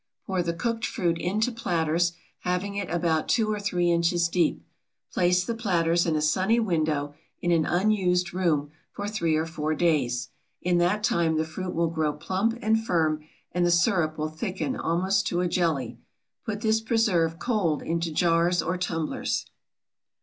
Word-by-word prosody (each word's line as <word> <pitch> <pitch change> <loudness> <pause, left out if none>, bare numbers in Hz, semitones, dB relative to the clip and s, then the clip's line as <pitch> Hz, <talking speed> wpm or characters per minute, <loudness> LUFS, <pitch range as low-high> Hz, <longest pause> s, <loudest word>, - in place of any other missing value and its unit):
Pour 190 -3 0
the 170 -1 -1
cooked 230 +3 -2
fruit 170 -2 0
into 215 +8 0
platters, 175 -5 0 0.3
having 180 +3 -2
it 200 -2 -3
about 165 -2 0
2 220 -2 +2
or 210 - -2
3 180 -4 +1
inches 170 0 +2
deep. 170 -1 0 0.5
Place 180 0 +3
the 235 - -2
platters 175 -6 +1
in 160 - +1
a 155 - +1
sunny 190 +9 +2
window, 155 -8 0 0.3
in 175 - 0
an 165 -2 +3
unused 180 -2 +1
room, 155 -6 0 0.2
for 205 - -5
three 170 -7 0
or 160 +1 +1
four 155 -1 -2
days. 140 -7 +1 0.3
In 175 -1 +1
that 185 +5 +1
time 165 -6 +2
the 160 - +1
fruit 180 +3 -5
will 170 0 +1
grow 155 -2 0
plump 195 +9 -1
and 220 +1 +2
firm, 155 -6 +1 0.3
and 175 +1 0
the 175 - +3
sirup 170 -3 +2
will 155 0 -2
thicken 185 +10 -3
almost 190 +4 0
to 175 - 0
a 180 - +1
jelly. 165 -6 -1 0.5
Put 210 -1 -3
this 220 -1 +2
preserve, 205 -8 +1
cold, 190 - 0
into 165 0 -1
jars 170 +2 +2
or 180 +2 -2
tumblers. 165 -3 -2
175 Hz, 170 wpm, -26 LUFS, 160-195 Hz, 0.5 s, Place